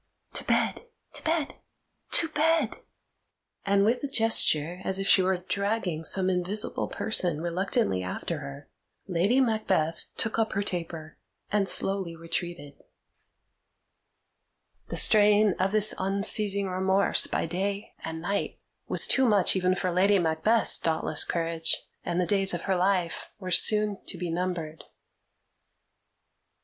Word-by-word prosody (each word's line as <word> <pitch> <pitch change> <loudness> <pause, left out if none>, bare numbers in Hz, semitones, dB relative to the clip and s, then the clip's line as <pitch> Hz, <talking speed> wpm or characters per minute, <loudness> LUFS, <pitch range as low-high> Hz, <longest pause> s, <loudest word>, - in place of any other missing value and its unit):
To - - -2
bed, 480 - -1 0.3
to - - -3
bed, 320 -2 -1 0.6
to 330 - +4
bed!" 310 -4 +1 0.9
And, 200 0 +3
with 235 +3 +1
a - - -1
gesture 180 - +2
as 190 0 -1
if 195 0 -3
she 190 - +5
were 185 0 0
dragging 195 -2 -3
some 185 +3 +1
invisible 185 +3 -1
person 180 -8 0
reluctantly 170 - -1
after 120 - -5
her, 140 0 -10 0.4
Lady 195 +8 +1
Macbeth 205 -10 -1
took 225 0 -2
up 220 -1 0
her 200 +1 -1
taper 165 -4 -6 0.3
and 200 -2 +1
slowly 190 -4 +1
retreated. 165 -3 -6 2.1
The - - -5
strain 210 -1 +5
of 190 +1 0
this 215 0 +3
unceasing 200 +1 +1
remorse 190 +1 +2
by - - -2
day 195 +4 -4
and 160 0 -6
night 200 +3 -3 0.3
was - - +3
too 265 - +3
much 200 -3 +3
even 185 0 +1
for 185 -1 -2
Lady 195 +3 +3
Macbeth's 175 +7 +2
dauntless 160 -1 0
courage, 165 -1 -1 0.2
and 175 0 -2
the 180 - +1
days 195 -1 +2
of 170 - -6
her 195 - 0
life 180 -2 -1
were 185 -3 -7
soon 210 +2 +3
to - - -5
be 175 -1 -4
numbered. 170 -3 -4
190 Hz, 135 wpm, -26 LUFS, 170-205 Hz, 2.1 s, she